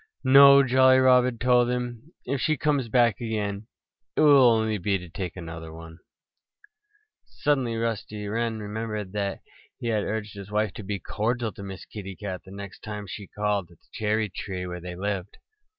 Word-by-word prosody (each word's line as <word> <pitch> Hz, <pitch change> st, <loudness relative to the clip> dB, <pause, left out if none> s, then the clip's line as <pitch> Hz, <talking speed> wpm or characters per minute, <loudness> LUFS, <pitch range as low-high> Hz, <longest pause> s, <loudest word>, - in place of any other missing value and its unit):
"No!" 140 Hz, +1 st, +8 dB
Jolly 130 Hz, 0 st, +5 dB
Robin 125 Hz, -2 st, +4 dB
told 125 Hz, 0 st, +3 dB
him. 125 Hz, +3 st, -4 dB
"If 135 Hz, +1 st, -2 dB
she 155 Hz, -1 st, +1 dB
comes 140 Hz, -5 st, 0 dB
back 120 Hz, -1 st, +3 dB
again 105 Hz, -2 st, -3 dB, 0.5 s
it -, -, +2 dB
will 140 Hz, -5 st, +7 dB
only 110 Hz, -2 st, +1 dB
be 100 Hz, +2 st, +1 dB
to 90 Hz, -1 st, -10 dB
take 90 Hz, +1 st, -6 dB
another 80 Hz, -2 st, -7 dB
one." 80 Hz, +1 st, -11 dB, 1.2 s
Suddenly 135 Hz, -6 st, -1 dB
Rusty 110 Hz, -2 st, -3 dB
Wren 115 Hz, +1 st, -1 dB
remembered 105 Hz, -1 st, -5 dB
that 100 Hz, -1 st, -3 dB, 0.4 s
he 120 Hz, -, -3 dB
had 110 Hz, -2 st, +1 dB
urged 105 Hz, -1 st, -4 dB
his 100 Hz, -1 st, -9 dB
wife 105 Hz, -1 st, 0 dB
to 110 Hz, -, -8 dB
be 100 Hz, +1 st, -3 dB
cordial 110 Hz, +5 st, -2 dB
to -, -, -11 dB
Miss 95 Hz, -2 st, -8 dB
Kitty 100 Hz, -3 st, -8 dB
Cat 95 Hz, -2 st, -6 dB
the -, -, -15 dB
next 100 Hz, -1 st, -9 dB
time 105 Hz, -1 st, -6 dB
she 100 Hz, 0 st, -8 dB
called 105 Hz, -4 st, -2 dB
at 85 Hz, -, -19 dB
the -, -, -32 dB
cherry 110 Hz, 0 st, 0 dB
tree 95 Hz, -1 st, -5 dB
where 90 Hz, -1 st, -6 dB
they 90 Hz, 0 st, -7 dB
lived. 100 Hz, 0 st, -4 dB
105 Hz, 180 wpm, -26 LUFS, 100-120 Hz, 1.2 s, No